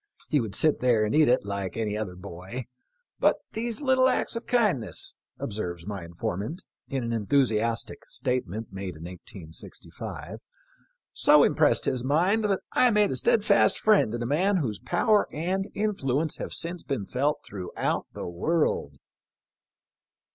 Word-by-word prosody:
He 150 Hz, -3 st, +4 dB
would 110 Hz, -4 st, -3 dB
sit 155 Hz, -2 st, +3 dB
there 120 Hz, -4 st, +3 dB
and 105 Hz, -, -1 dB
eat 155 Hz, -3 st, +5 dB
it 125 Hz, -4 st, +3 dB
like 100 Hz, -1 st, -3 dB
any 105 Hz, -2 st, -1 dB
other 105 Hz, -4 st, -4 dB
boy; 95 Hz, +6 st, -7 dB, 0.5 s
but -, -, +4 dB, 0.2 s
these 230 Hz, +3 st, -3 dB
little 260 Hz, -1 st, +4 dB
acts -, -, 0 dB
of 230 Hz, -, -5 dB
kindness," 185 Hz, -, 0 dB, 0.2 s
observes 85 Hz, -5 st, -4 dB
my 100 Hz, -3 st, -5 dB
inform 85 Hz, +2 st, -3 dB
ant, 155 Hz, -, -6 dB, 0.2 s
in 135 Hz, -2 st, -2 dB
an 115 Hz, 0 st, -2 dB
enthusiastic 115 Hz, -1 st, 0 dB
statement 115 Hz, -4 st, -2 dB
made 95 Hz, -2 st, -5 dB
in 80 Hz, -, -10 dB
1865, 85 Hz, -2 st, -8 dB, 0.7 s
"so -, -, +6 dB
impressed -, -, +3 dB
his 125 Hz, -2 st, 0 dB
mind 180 Hz, +11 st, +2 dB
that 195 Hz, -2 st, +1 dB
I 250 Hz, -, +5 dB
made 210 Hz, -2 st, +3 dB
a -, -, -1 dB
steadfast 200 Hz, -, +4 dB
friend 210 Hz, -, +3 dB
in 120 Hz, -, -3 dB
a -, -, -2 dB
man 185 Hz, +10 st, +2 dB
whose 120 Hz, -, -2 dB
power 210 Hz, +4 st, +2 dB
and 185 Hz, +5 st, -2 dB
influence 160 Hz, -8 st, 0 dB
have -, -, -5 dB
since 170 Hz, 0 st, -3 dB
been 135 Hz, -9 st, -3 dB
felt 140 Hz, +7 st, 0 dB
throughout 95 Hz, -3 st, -3 dB
the -, -, -6 dB
world." 150 Hz, -, 0 dB
125 Hz, 155 wpm, -27 LUFS, -, 0.7 s, so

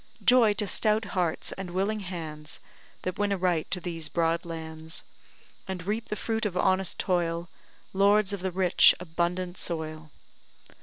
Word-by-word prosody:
Joy, 245 Hz, -4 st, +6 dB
to 210 Hz, -, 0 dB
stout 215 Hz, +2 st, +2 dB
hearts 175 Hz, -4 st, 0 dB
and 190 Hz, -2 st, -4 dB
willing 195 Hz, +4 st, 0 dB
hands, 160 Hz, -5 st, -6 dB, 0.4 s
That 185 Hz, +1 st, -3 dB
win 205 Hz, -1 st, +1 dB
a 200 Hz, -, +1 dB
right 175 Hz, -3 st, 0 dB
to 185 Hz, -, -1 dB
these 165 Hz, -3 st, -4 dB
broad 165 Hz, 0 st, 0 dB
lands, 160 Hz, -1 st, -6 dB, 0.6 s
And 185 Hz, -2 st, -5 dB
reap 215 Hz, +3 st, -2 dB
the 210 Hz, -, -3 dB
fruit 225 Hz, +1 st, -2 dB
of 180 Hz, -3 st, -5 dB
honest 190 Hz, 0 st, +2 dB
toil, 170 Hz, -1 st, 0 dB, 0.4 s
Lords 200 Hz, +1 st, +4 dB
of 200 Hz, -, -3 dB
the 190 Hz, +1 st, -1 dB
rich, 185 Hz, 0 st, +5 dB
abundant 175 Hz, +1 st, -2 dB
soil. 155 Hz, -2 st, -3 dB
180 Hz, 155 wpm, -28 LUFS, 165-200 Hz, 0.6 s, Joy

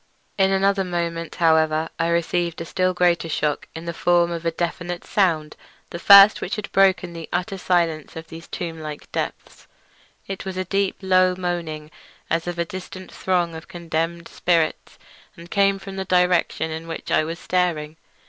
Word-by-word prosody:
In 195 Hz, -1 st, +3 dB
another 195 Hz, 0 st, +2 dB
moment, 170 Hz, -2 st, -3 dB
however, 160 Hz, -2 st, +3 dB
I 165 Hz, -, +1 dB
received 170 Hz, 0 st, 0 dB
a 165 Hz, -, -5 dB
still 185 Hz, +2 st, 0 dB
greater 175 Hz, -2 st, +1 dB
shock 150 Hz, -1 st, -1 dB
in 165 Hz, +1 st, -7 dB
the 170 Hz, -, -3 dB
form 175 Hz, +1 st, +2 dB
of 170 Hz, 0 st, -3 dB
a -, -, +2 dB
definite 175 Hz, +1 st, -4 dB
sound—the 170 Hz, -2 st, -2 dB
first 200 Hz, +2 st, +8 dB
which 185 Hz, -, -3 dB
had 210 Hz, -1 st, -6 dB
broken 190 Hz, -2 st, +3 dB
the 165 Hz, -1 st, -8 dB
utter 180 Hz, +2 st, -2 dB
silence 170 Hz, -4 st, 0 dB
of 160 Hz, 0 st, -7 dB
these 165 Hz, +1 st, -11 dB
tomb 165 Hz, -2 st, -5 dB
like 150 Hz, -1 st, -8 dB
depths. -, -, -5 dB, 0.6 s
It 195 Hz, -1 st, -6 dB
was 190 Hz, -1 st, -6 dB
a 185 Hz, -, -2 dB
deep, 195 Hz, +1 st, 0 dB
low 185 Hz, -1 st, +4 dB
moaning, 170 Hz, -4 st, -4 dB, 0.4 s
as 165 Hz, +1 st, 0 dB
of 175 Hz, 0 st, -3 dB
a 170 Hz, -, 0 dB
distant 185 Hz, +1 st, -9 dB
throng 175 Hz, -3 st, 0 dB
of 160 Hz, 0 st, -9 dB
condemned 170 Hz, 0 st, -3 dB
spirits, 165 Hz, -3 st, 0 dB, 0.4 s
and 170 Hz, 0 st, -13 dB
came 195 Hz, -1 st, +3 dB
from 195 Hz, 0 st, -9 dB
the 190 Hz, -, -3 dB
direction 180 Hz, -3 st, +2 dB
in 160 Hz, +1 st, -6 dB
which 165 Hz, -, -6 dB
I -, -, +3 dB
was 165 Hz, +2 st, -4 dB
staring. 170 Hz, -4 st, -1 dB
170 Hz, 175 wpm, -22 LUFS, 165-185 Hz, 0.6 s, first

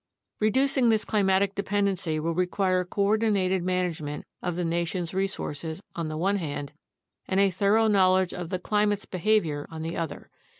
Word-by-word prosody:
Reducing 260 Hz, +3 st, +3 dB
this 220 Hz, -1 st, +2 dB
climatic 195 Hz, -1 st, +2 dB
dependency 200 Hz, -5 st, -1 dB
will 165 Hz, +2 st, -1 dB
require 185 Hz, +1 st, +1 dB
coordinated 200 Hz, -1 st, +1 dB
man 180 Hz, +1 st, +1 dB
agement 150 Hz, -2 st, -6 dB, 0.2 s
of 180 Hz, -2 st, -2 dB
the 175 Hz, 0 st, -1 dB
nation's 170 Hz, +1 st, -2 dB
resources 170 Hz, -4 st, -3 dB, 0.2 s
on 170 Hz, -2 st, -2 dB
the 155 Hz, 0 st, -4 dB
one 195 Hz, +5 st, +1 dB
hand 145 Hz, -4 st, -5 dB, 0.5 s
and 190 Hz, -, +1 dB
a 200 Hz, -1 st, +4 dB
thorough 205 Hz, +4 st, +3 dB
knowledge 185 Hz, -3 st, +3 dB
of 175 Hz, -2 st, -5 dB
the 185 Hz, -, -1 dB
climate's 205 Hz, +2 st, 0 dB
behavior 180 Hz, -6 st, 0 dB
on 160 Hz, -1 st, -6 dB
the 165 Hz, +1 st, -4 dB
other. 165 Hz, -3 st, -5 dB
185 Hz, 160 wpm, -27 LUFS, 170-200 Hz, 0.5 s, a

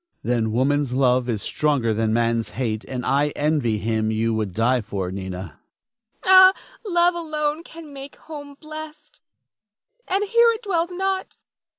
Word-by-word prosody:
Then 115 Hz, -2 st, 0 dB
woman's 135 Hz, +2 st, +1 dB
love 125 Hz, -1 st, +2 dB
is 110 Hz, -3 st, -2 dB
stronger 140 Hz, -7 st, 0 dB
than 110 Hz, 0 st, 0 dB
man's 115 Hz, 0 st, +1 dB
hate, 110 Hz, -4 st, -2 dB
and 125 Hz, -1 st, -5 dB
I 140 Hz, +2 st, +2 dB
envy 145 Hz, -7 st, +1 dB
him 110 Hz, 0 st, -1 dB
you 110 Hz, +1 st, 0 dB
would 110 Hz, -3 st, -2 dB
die 120 Hz, +6 st, +1 dB
for, 95 Hz, -4 st, -4 dB
Nina. 95 Hz, 0 st, -5 dB
Nina. 95 Hz, +1 st, -8 dB, 0.7 s
Ah, 375 Hz, 0 st, +8 dB, 0.3 s
love 350 Hz, -3 st, +3 dB
alone 310 Hz, -2 st, -2 dB
can 325 Hz, -3 st, -12 dB
make 275 Hz, 0 st, -9 dB
home 290 Hz, -3 st, -10 dB
blest, 310 Hz, -1 st, -10 dB, 0.9 s
and 390 Hz, +2 st, +1 dB
here 465 Hz, +3 st, +4 dB
it 455 Hz, -, -8 dB
dwells 345 Hz, -4 st, 0 dB
not. 380 Hz, +1 st, -3 dB
145 Hz, 155 wpm, -23 LUFS, -, 0.9 s, Ah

